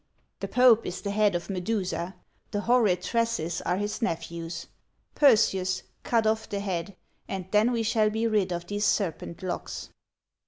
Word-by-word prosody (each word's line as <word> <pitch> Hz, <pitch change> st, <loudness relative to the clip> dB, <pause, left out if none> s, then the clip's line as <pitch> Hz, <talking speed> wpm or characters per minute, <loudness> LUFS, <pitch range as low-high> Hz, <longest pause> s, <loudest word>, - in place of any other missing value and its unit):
"The -, -, -3 dB
pope 245 Hz, -3 st, +5 dB
is 180 Hz, 0 st, -5 dB
the 200 Hz, -, -3 dB
head 205 Hz, -2 st, +3 dB
of 175 Hz, -, -3 dB
Medusa; 185 Hz, -2 st, -2 dB, 0.3 s
the 205 Hz, -, -2 dB
horrid 215 Hz, -7 st, +3 dB
tresses 230 Hz, -7 st, 0 dB
are 180 Hz, -, 0 dB
his 205 Hz, +1 st, -3 dB
nephews; 170 Hz, -4 st, -3 dB, 0.5 s
Perseus, 190 Hz, -9 st, +3 dB, 0.2 s
cut 230 Hz, -2 st, +1 dB
off 220 Hz, 0 st, 0 dB
the 200 Hz, -, -2 dB
head, 190 Hz, -1 st, -3 dB, 0.3 s
and 190 Hz, -2 st, -4 dB
then 215 Hz, +3 st, +4 dB
we 230 Hz, -2 st, 0 dB
shall 215 Hz, -1 st, +2 dB
be 220 Hz, +2 st, -1 dB
rid 210 Hz, -5 st, +1 dB
of 175 Hz, 0 st, -3 dB
these 205 Hz, +2 st, -3 dB
serpent 180 Hz, -4 st, -1 dB
locks." 185 Hz, -, -4 dB
205 Hz, 160 wpm, -27 LUFS, 180-220 Hz, 0.5 s, pope